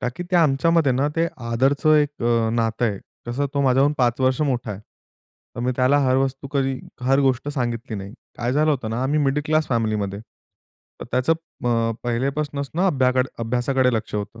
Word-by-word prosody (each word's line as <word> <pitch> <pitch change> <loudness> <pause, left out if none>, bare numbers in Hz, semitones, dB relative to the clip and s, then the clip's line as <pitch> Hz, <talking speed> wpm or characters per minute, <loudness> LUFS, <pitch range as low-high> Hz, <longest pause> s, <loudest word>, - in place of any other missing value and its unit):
का 125 - -1
की - - -4
ते 180 - +3
आमच्यामध्ये 160 -1 +3
ना, 135 +4 +1
ते 165 +1 +2 0.2
आदरचं 140 +6 +2
अ, - - +6
एक 145 -3 -1 0.3
नातं 115 0 0
आहे. 100 -3 -2 0.3
कसं, 135 +4 -1
तो 140 - +1
माझ्याहून 135 +2 +3
5 120 0 +1
वर्ष 130 +2 +2
मोठा 125 -6 -1
आहे. 100 0 -6 0.8
तर - - -4
मी 125 +1 0
त्याला 130 +3 +3
हर 130 0 +3
वस्तू 135 +1 -1
कधी 135 -2 0 0.2
हर 135 +2 +3
गोष्ट 135 0 +1
सांगितली 120 -4 -3
नाही. 100 +1 -7 0.3
काय 120 +1 -1
झालं 155 +3 +3
होतं 125 -7 -2
ना, 115 +3 -2
आम्ही 145 +3 +1
मिडल 145 +1 +1
क्लास 155 0 +1
फॅमिलीमध्ये. 110 -4 -1 0.8
तर - - -5
अ, - - -16
त्याचं 130 +6 +2 0.3
अ, 115 -1 +1
पहिलेपासनंच 140 +3 -2 0.2
अभ्या 130 -7 +2 0.3
अभ्यासाकडे 125 +2 +1
लक्ष 110 - -3
होतं, 105 +2 -4
130 Hz, 185 wpm, -22 LUFS, 120-140 Hz, 0.8 s, अ